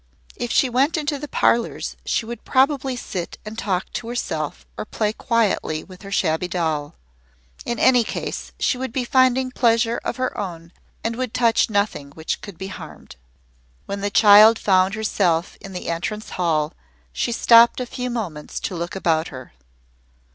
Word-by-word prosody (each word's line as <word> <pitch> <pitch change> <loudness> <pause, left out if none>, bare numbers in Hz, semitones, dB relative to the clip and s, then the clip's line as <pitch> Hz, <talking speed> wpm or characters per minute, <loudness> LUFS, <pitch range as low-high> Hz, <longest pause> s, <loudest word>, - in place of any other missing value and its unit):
If 240 - -4
she 270 - +4
went 265 +6 +1
into 295 -2 -2
the 295 - -6
parlours 235 -3 0
she - - 0
would 235 0 -7
probably 265 -1 +2
sit 185 -7 -5
and 215 +1 -7
talk 190 -4 -2
to 230 - -4
herself 160 -11 -3
or - - -4
play 215 0 -2
quietly 220 -10 0
with 185 -1 -14
her 195 0 -10
shabby 160 -1 +1
doll. 160 -4 -2 0.7
In 235 - -1
any 245 0 +5
case - - -5
she 250 - +1
would 260 -1 -3
be 250 +1 -1
finding 255 0 +3
pleasure 230 -1 +2
of - - -2
her 255 0 -2
own 170 -4 -6 0.3
and 230 0 -1
would 255 -3 -3
touch 230 -2 +3
nothing 200 -9 -1
which 160 +1 -4
could 200 -5 -10
be 190 +2 -6
harmed. 185 - -10 0.7
When 200 0 -5
the 205 - 0
child 210 +2 +7
found 190 -1 +2
herself 185 -6 0
in 195 - -9
the 180 - -6
entrance 195 +6 -3
hall 155 -4 0 0.4
she - - -1
stopped 235 +1 +6
a 250 - -2
few 250 +1 -4
moments 185 -11 -5
to 185 - -3
look 170 +2 -4
about 165 -4 +1
her. 130 - -10
215 Hz, 170 wpm, -22 LUFS, 175-240 Hz, 0.7 s, child